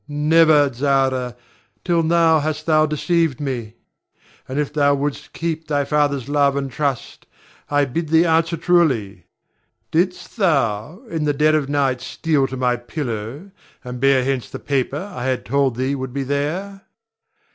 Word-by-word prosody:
Never, 150 -1 +4
Zara, 130 -1 0 0.5
till 170 -2 +2
now 165 -1 +3
hast 155 +1 -3
thou 155 -1 +3
deceived 160 -1 0
me; 120 -6 -4 0.7
and 130 - -4
if 150 -1 -1
thou 145 -1 +3
wouldst 145 +1 -4
keep 160 -1 -4
thy 145 -2 0
father's 140 -3 0
love 145 -1 +2
and 140 -1 -3
trust, 140 -1 -3 0.4
I 145 0 +2
bid 155 +5 -3
thee 165 +2 +4
answer 165 0 +2
truly. 130 - +1 0.7
Didst 180 +4 -1
thou, 150 - 0
in 160 -2 -1
the 145 - +1
dead 155 +2 +3
of 150 -3 0
night 135 -3 0
steal 135 +3 0
to 130 - -6
my 125 -1 +1
pillow, 120 - -6 0.3
and 125 0 -7
bear 135 -1 +3
hence 130 -2 -2
the - - -6
paper 145 +7 -2
I 125 - -5
had 130 -1 -1
told 135 -1 +1
thee 130 +3 -1
would 130 -2 -5
be 140 0 -2
there? 160 +9 -3
145 Hz, 155 wpm, -20 LUFS, 130-160 Hz, 0.7 s, Never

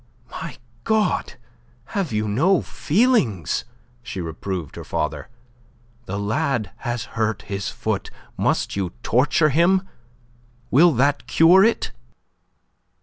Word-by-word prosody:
"My - - -7 0.3
God, 220 -1 +1 0.6
have 195 - -1
you 105 0 -1
no 160 - +2
feelings?" 155 - +1 0.4
she 115 -5 -6
reproved 85 0 -5
her - - -7
father. 75 -2 -3 0.8
"The 100 - -3
lad 115 +2 -1
has 120 -2 -3
hurt 110 -2 -1
his 100 -1 -4
foot. - - -3 0.3
Must - - 0
you 95 -3 -2
torture 145 +6 +3
him? 180 +6 +3 0.8
Will 165 +6 +6
that 140 +3 +1
cure 175 +4 +6
it?" 225 +2 +1
125 Hz, 110 wpm, -22 LUFS, -, 0.8 s, Will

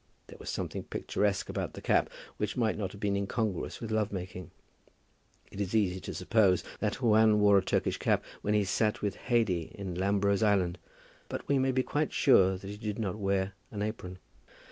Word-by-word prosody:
There - - -13
was - - -7
something - - -3
picturesque 100 -2 -1
about - - -3
the - - -8
cap, - - +2 0.3
which 105 +2 -2
might 115 -3 +2
not 95 -3 -3
have 100 - -11
been 100 -2 0
incongruous 100 -1 -2
with 115 -2 -5
love 110 -2 +1
making. 90 -3 -6 1.0
It 100 - -5
is 100 +2 -2
easy 95 -4 +2
to 95 - -6
suppose 95 0 +3 0.2
that 110 +4 -2
Juan 110 -1 +5
wore 100 -1 +6
a - - -4
Turkish - - 0
cap - - +1 0.2
when 105 +1 +1
he 105 - +3
sat 105 +3 0
with 100 -1 -1
Haidee 95 -9 +1
in 95 -3 -5
Lambro's 100 +2 +1
island. 95 -5 +2 0.5
But - - -5
we 140 -1 +3
may 130 0 +2
be 130 0 +1
quite 150 +3 -1
sure 95 -9 +5
that 95 - -10
he 105 +1 -6
did 105 -1 -4
not 105 -2 -3
wear 100 -1 0 0.2
an 105 -1 -4
apron. 95 -4 -5
100 Hz, 195 wpm, -30 LUFS, 95-110 Hz, 1.0 s, wore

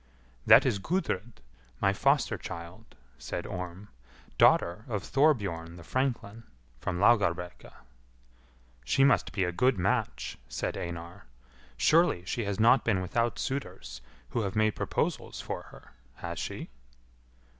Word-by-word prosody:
"That - - +8
is 100 - +1
Gudrid, 120 - -2 0.4
my - - +3
foster - - +2
child," 85 +6 -9 0.2
said - - -5
Orm, 90 +3 -6 0.5
"daughter 85 +5 +4
of 105 -6 -3
Thorbjorn 100 - +1
the 85 - -11
franklin, 115 -1 -2 0.4
from 90 +7 -3
Laugarbrekka." 90 -4 +2 1.1
"She 65 - +2
must 135 -2 +3
be 95 - 0
a 90 - 0
good 125 +6 +2
match," 90 - -1
said - - -3
Einar; 85 0 -7 0.5
"surely 155 - +3
she 115 +4 -2
has 100 +1 -3
not 120 +3 +5
been 110 -5 +1
without 115 +6 -1
suitors 90 - -5 0.3
who 120 - -1
have 100 -1 -3
made 110 0 +3
proposals - - -2
for - - -4
her, - - -16 0.2
has 85 +2 -6
she?" - - -5
100 Hz, 130 wpm, -29 LUFS, 85-120 Hz, 1.1 s, That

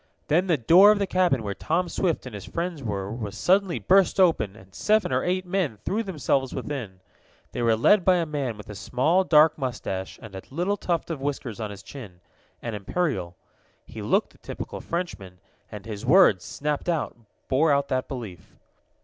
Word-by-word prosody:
Then 175 +5 +3
the 165 -4 +3
door 175 - +7
of 210 - +2
the 200 - 0
cabin 180 -10 +1
where 100 -1 -3
Tom 170 - -1
Swift 170 -4 -1
and 125 - -8
his 100 -2 -7
friends 170 -2 -4
were 100 -4 -3
was 105 -3 -6
suddenly 190 - +2
burst 195 0 +3
open, 160 - +3
and 95 -3 -17
seven 210 - +1
or - - +1
eight 185 +1 -1
men 180 - -1
threw 215 +3 0
themselves 145 - -1
within. 110 -11 -5 0.5
They - - -4
were 115 -1 +3
led 185 - +4
by 185 0 +4
a 170 -2 +1
man 140 -7 -3
with 105 - -11
a 105 - -7
small, 145 - +1
dark 155 -3 +5
mustache 115 -8 -4
and 110 -3 -11
a 95 - -6
little 175 +8 -1
tuft 170 -4 -2
of 150 -5 -5
whiskers 135 -6 -4
on 110 -2 -3
his 100 -1 -10
chin 100 -8 -11 0.4
an 115 - -4
imperial. 105 - -2 0.5
He - - -9
looked - - +1
the - - -23
typical - - -7
Frenchman, 135 - -5 0.3
and 105 -2 -9
his 105 -2 -6
words, 145 - +5
snapped 150 +3 -3
out, 165 -3 -1 0.3
bore 145 +4 +3
out 140 0 +2
that 130 -1 -1
belief. 110 - -8
140 Hz, 190 wpm, -25 LUFS, 105-180 Hz, 0.5 s, door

